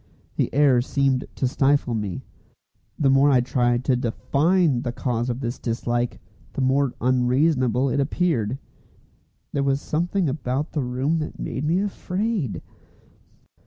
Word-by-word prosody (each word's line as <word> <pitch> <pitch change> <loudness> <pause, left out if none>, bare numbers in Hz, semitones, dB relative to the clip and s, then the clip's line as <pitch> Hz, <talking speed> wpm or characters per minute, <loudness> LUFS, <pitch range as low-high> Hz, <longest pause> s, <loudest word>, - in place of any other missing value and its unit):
The - - 0
air 140 -4 +4
seemed 135 0 0
to 130 - 0
stifle 135 -1 +1
me. 105 -5 -3 0.7
The 140 -4 +3
more 135 +2 +5
I 130 -3 +5
tried 120 0 0
to 130 - +3
define 140 +4 +1
the 120 -2 -3
cause 120 -1 -2
of 120 +2 -3
this 120 0 -4
dislike, 120 0 -2 0.3
the - - -3
more 130 0 +1
unreasonable 130 +1 +2
it 135 +2 0
appeared. 135 - 0 1.0
There 140 - 0
was 140 0 +1
something 175 +5 -1
about 135 +1 -2
the 150 - -1
room 130 +6 -1
that 155 - -5
made 135 - -4
me 170 +5 +2
afraid. 200 - -2
135 Hz, 140 wpm, -23 LUFS, 125-150 Hz, 1.0 s, more